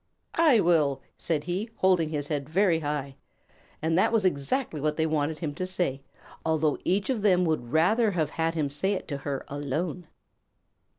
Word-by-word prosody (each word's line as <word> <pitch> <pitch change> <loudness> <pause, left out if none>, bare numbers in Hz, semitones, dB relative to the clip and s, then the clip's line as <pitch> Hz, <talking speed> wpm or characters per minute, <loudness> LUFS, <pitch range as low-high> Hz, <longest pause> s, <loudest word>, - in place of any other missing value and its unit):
"I 305 -9 +6
will," 155 -6 +2
said 155 -3 -1
he, 190 +6 -3
holding 185 -6 +3
his 145 -2 -3
head 145 -2 -2
very 175 -1 +3
high. 145 -3 -3 0.7
And 160 0 +1
that - - +3
was 220 -4 +2
exactly 165 - 0
what 150 0 0
they 160 - +2
wanted 155 0 0
him 155 -3 -4
to 185 +5 -4
say, 175 -7 -2 0.4
although 160 -2 +1
each 200 +7 +1
of 235 -5 -1
them 185 -3 +4
would 155 -8 -1
rather 210 - +3
have 160 -6 -1
had 165 0 -1
him 150 -3 -1
say 190 +8 0
it 190 - -4
to 140 - -2
her 140 -1 -4
alone. 150 +5 -3
160 Hz, 180 wpm, -27 LUFS, 145-185 Hz, 0.7 s, I